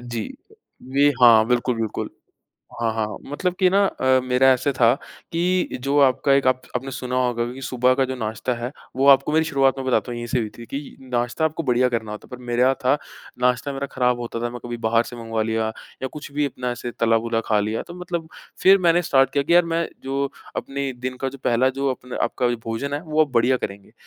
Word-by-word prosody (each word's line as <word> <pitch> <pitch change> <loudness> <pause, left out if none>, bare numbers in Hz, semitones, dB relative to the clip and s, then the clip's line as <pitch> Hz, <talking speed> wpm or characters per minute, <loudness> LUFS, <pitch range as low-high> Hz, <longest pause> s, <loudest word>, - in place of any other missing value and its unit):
जी। 120 -2 -5 0.7
ये 145 +1 +6
हाँ, 115 -2 +8
बिल्कुल-बिल्कुल। 120 -3 -1 0.7
हाँ, 115 - +1
हाँ, 110 -1 0
हाँ। 105 - -7
मतलब 180 +4 -1
कि 185 - +5
ना 195 +2 +3
अ, 130 -8 +2
मेरा 130 +1 +3
ऐसे 130 +3 0
था 120 -2 +4 0.4
कि 180 +2 0
जो 140 +1 +1
आपका 135 +1 +3
एक 140 -1 +3
आप 130 0 +2
आपने 135 +2 -3
सुना 125 -1 -4
होगा 120 -1 -1
कि 135 - -10
सुबह 125 -1 +2
का 135 - +2
जो 130 0 -4
नाश्ता 110 +2 -2
है, 120 +2 -5 0.2
वो 135 +2 +2
आपको 135 +2 +5
मेरी 160 +1 +3
शुरुआत 135 -3 +2
मैं 135 - -4
बताता 125 -1 +1
हूँ, 120 - -4
यहीं 120 0 -5
से 125 - 0
हुई 110 -2 -2
थी 120 - -9
कि 140 +3 -7
नाश्ता 125 +3 -1
आपको 160 +1 -2
बढ़िया 125 -2 +2
करना 115 -3 -3
होता, 105 - -8
पर 125 - -9
मेरे 120 -1 -2
यहाँ 130 +1 +4
था 130 - +5 0.5
नाश्ता 125 +3 +1
मेरा 135 +1 -4
ख़राब 125 -1 +1
होता 115 -1 -4
था। 120 - -1
मैं 120 0 -7
कभी 120 0 -4
बाहर 115 +1 +3
से 120 - -9
मँगवा 115 -1 -3
लिया 110 0 -1 0.4
या - - 0
कुछ 150 -1 -8
भी 145 +1 0
अपना 125 -2 -3
ऐसे 120 0 -5
तला-भुना 115 0 +1
खा 105 -1 +2
लिया, 110 +2 -1
तो 175 - -11
मतलब 170 -2 -4 0.3
फिर 195 +1 +7
मैंने 170 +1 +4
स्टार्ट 135 -5 +3
किया 140 -1 +2
कि 170 - +1
यार 175 -1 +6
मैं 165 0 -1 0.2
जो 135 +1 -1 0.3
अपने 140 0 -3
दिन 130 +1 -4
का 135 - 0
जो 140 - -11
पहला 125 +2 +3
जो 140 0 +1
अपने 125 0 -8
आपका 125 - 0 0.2
भोजन 115 +6 -3
है, 145 - -2
वो 155 -2 +1
आप 140 - -17
बढ़िया 120 +2 +3
करेंगे। 100 -4 -7
130 Hz, 230 wpm, -22 LUFS, 120-140 Hz, 0.7 s, हाँ